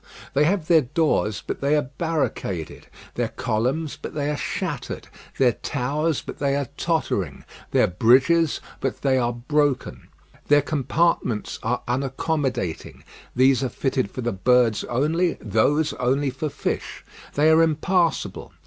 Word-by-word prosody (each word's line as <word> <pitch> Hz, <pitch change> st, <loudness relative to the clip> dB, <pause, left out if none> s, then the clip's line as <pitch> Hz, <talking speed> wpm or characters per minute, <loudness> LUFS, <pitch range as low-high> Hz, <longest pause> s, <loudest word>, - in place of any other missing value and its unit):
They 145 Hz, +2 st, +4 dB
have 175 Hz, -1 st, 0 dB
their 165 Hz, -2 st, +6 dB
doors, 130 Hz, -, 0 dB
but -, -, -4 dB
they 140 Hz, +2 st, +2 dB
are 150 Hz, -, +2 dB, 0.2 s
barricaded; 145 Hz, -, -2 dB, 0.3 s
their -, -, -1 dB
columns, 135 Hz, +8 st, -2 dB
but -, -, -7 dB
they 145 Hz, 0 st, -1 dB
are -, -, -1 dB
shattered; 150 Hz, -3 st, -4 dB, 0.3 s
their 130 Hz, -2 st, +4 dB
towers, 145 Hz, +6 st, -2 dB
but -, -, -8 dB
they 140 Hz, -1 st, +1 dB
are 140 Hz, -2 st, -2 dB
tottering; 95 Hz, -, -1 dB, 0.3 s
their -, -, +4 dB
bridges, 130 Hz, -, +3 dB, 0.2 s
but -, -, -3 dB
they 135 Hz, -2 st, +3 dB
are 120 Hz, -1 st, +1 dB
broken. 140 Hz, +3 st, -1 dB, 0.4 s
Their 145 Hz, -1 st, +5 dB
compartments 145 Hz, -5 st, 0 dB
are 120 Hz, +2 st, -1 dB
unaccommodating; 135 Hz, -, -2 dB, 0.3 s
these 130 Hz, 0 st, +4 dB
are 130 Hz, -, 0 dB
fitted 130 Hz, -5 st, -1 dB
for 130 Hz, -, -6 dB
the 120 Hz, 0 st, -1 dB
birds 115 Hz, +2 st, +3 dB
only, 160 Hz, +8 st, +1 dB
those 140 Hz, +9 st, +1 dB
only 135 Hz, +2 st, 0 dB
for 145 Hz, +4 st, -3 dB
fish. -, -, -4 dB, 0.3 s
They 155 Hz, +2 st, +4 dB
are 160 Hz, +1 st, +6 dB
impassable. 165 Hz, +2 st, 0 dB
140 Hz, 140 wpm, -23 LUFS, 125-155 Hz, 0.4 s, their